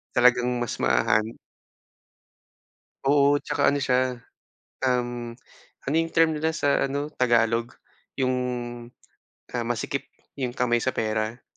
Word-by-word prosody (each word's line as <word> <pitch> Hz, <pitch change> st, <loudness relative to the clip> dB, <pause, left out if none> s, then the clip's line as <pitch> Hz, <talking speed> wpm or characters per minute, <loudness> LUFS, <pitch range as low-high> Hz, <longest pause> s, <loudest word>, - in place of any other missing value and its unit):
Talagang 125 Hz, 0 st, +5 dB
mas 120 Hz, -, -3 dB
mahahan 65 Hz, -, +3 dB, 1.8 s
Oo 145 Hz, 0 st, +4 dB
at -, -, -21 dB
saka 145 Hz, -, +2 dB
ano 145 Hz, -, 0 dB
siya, 130 Hz, -2 st, +1 dB, 0.6 s
um, 120 Hz, -2 st, -1 dB, 0.5 s
ano 145 Hz, -, 0 dB
yung 165 Hz, 0 st, +1 dB
term 160 Hz, -1 st, +3 dB
nila 160 Hz, +1 st, 0 dB
sa 145 Hz, -3 st, +1 dB
ano 145 Hz, +2 st, -2 dB
tagalog? 115 Hz, -1 st, +2 dB, 0.5 s
Yung, 130 Hz, 0 st, +2 dB, 1.2 s
ah, 120 Hz, -, -1 dB
masikip 120 Hz, +4 st, -3 dB, 0.2 s
yung 125 Hz, -3 st, -4 dB
kamay 120 Hz, -1 st, +2 dB
sa 130 Hz, -, +1 dB
pera? 110 Hz, +2 st, -2 dB
125 Hz, 120 wpm, -25 LUFS, 120-140 Hz, 1.8 s, Talagang